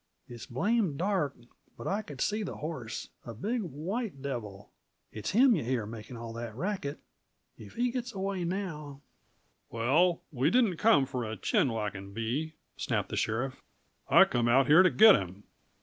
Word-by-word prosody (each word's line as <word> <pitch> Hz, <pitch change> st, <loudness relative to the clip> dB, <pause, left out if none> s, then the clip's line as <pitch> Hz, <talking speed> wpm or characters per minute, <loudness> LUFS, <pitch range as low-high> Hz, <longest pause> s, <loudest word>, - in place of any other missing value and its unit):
It's 120 Hz, -2 st, -9 dB
blame 195 Hz, -, 0 dB
dark, 180 Hz, -6 st, 0 dB, 0.4 s
but -, -, -9 dB
I 200 Hz, +2 st, 0 dB
could 145 Hz, -10 st, -9 dB
see 215 Hz, +1 st, 0 dB
the 200 Hz, -, -4 dB
horse 135 Hz, -8 st, -6 dB
a 115 Hz, -, -8 dB
big 225 Hz, -, -2 dB
white 180 Hz, -, -4 dB
devil. 120 Hz, -8 st, -6 dB, 0.4 s
It's 105 Hz, -, -5 dB
him 245 Hz, +5 st, +5 dB
yuh 160 Hz, -, -2 dB
hear 120 Hz, -2 st, -1 dB
makin' 115 Hz, +2 st, -9 dB
all 115 Hz, 0 st, -7 dB
that 115 Hz, -1 st, -6 dB
racket. 160 Hz, -, -3 dB, 0.6 s
If -, -, -13 dB
he 245 Hz, +1 st, +1 dB
gits 245 Hz, -1 st, -4 dB
away 195 Hz, -1 st, -3 dB
now 160 Hz, -6 st, -4 dB, 0.3 s
" -, -, -43 dB
"Well, 155 Hz, +10 st, +2 dB
we 135 Hz, +1 st, +1 dB
didn't 215 Hz, -4 st, +3 dB
come 155 Hz, -11 st, +4 dB
for 130 Hz, -2 st, -4 dB
a 110 Hz, -1 st, -5 dB
chin 125 Hz, -, +1 dB
whackin' 100 Hz, -3 st, -4 dB
bee," 130 Hz, +9 st, -3 dB, 0.2 s
snapped -, -, -1 dB
the -, -, -4 dB
sheriff. 130 Hz, +4 st, -2 dB, 0.5 s
"I -, -, +8 dB
come 120 Hz, -1 st, 0 dB
out 130 Hz, +3 st, +5 dB
here 155 Hz, +6 st, +7 dB
t' 185 Hz, -, +5 dB
git 215 Hz, +1 st, +8 dB
him." 95 Hz, +2 st, -5 dB
145 Hz, 175 wpm, -30 LUFS, 115-195 Hz, 0.6 s, I